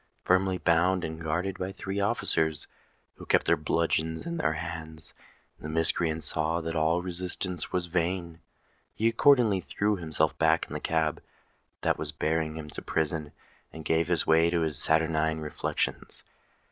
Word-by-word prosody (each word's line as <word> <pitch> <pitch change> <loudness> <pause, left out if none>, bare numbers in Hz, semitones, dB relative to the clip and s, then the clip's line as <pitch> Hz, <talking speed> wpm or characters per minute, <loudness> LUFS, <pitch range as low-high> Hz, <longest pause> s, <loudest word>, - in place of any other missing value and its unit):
Firmly 95 0 +2
bound, 90 +2 +2
and 80 +1 -5
guarded 90 +4 -2
by 95 +1 -3
three 95 +1 -4
officers, 80 -6 +3 0.5
who - - -10
kept - - +3
their - - +4
bludgeons 80 +1 -1
in 170 0 -3
their 80 - +1
hands, 80 -1 -4 0.5
the 75 - -7
miscreant 80 0 0
saw 80 +2 +1
that 80 0 -4
all 80 +2 +1
resistance 90 -1 -1
was 90 -1 0
vain: 85 -1 -2 0.6
he 110 - +1
accordingly 115 -4 +4
threw 100 +4 -1
himself 80 -3 0
back 80 0 +3
in - - -10
the - - -3
cab 80 -2 0 0.6
that - - +1
was 75 -1 -3
bearing 80 0 -1
him 80 -1 -7
to - - -5
prison, 80 -1 -2 0.4
and 80 -1 -10
gave 80 +1 +1 0.2
way 80 +1 +4
to 85 -1 0
his 75 -2 -1
saturnine 80 0 +2
reflections. 75 -1 -3
80 Hz, 155 wpm, -28 LUFS, 80-90 Hz, 0.6 s, their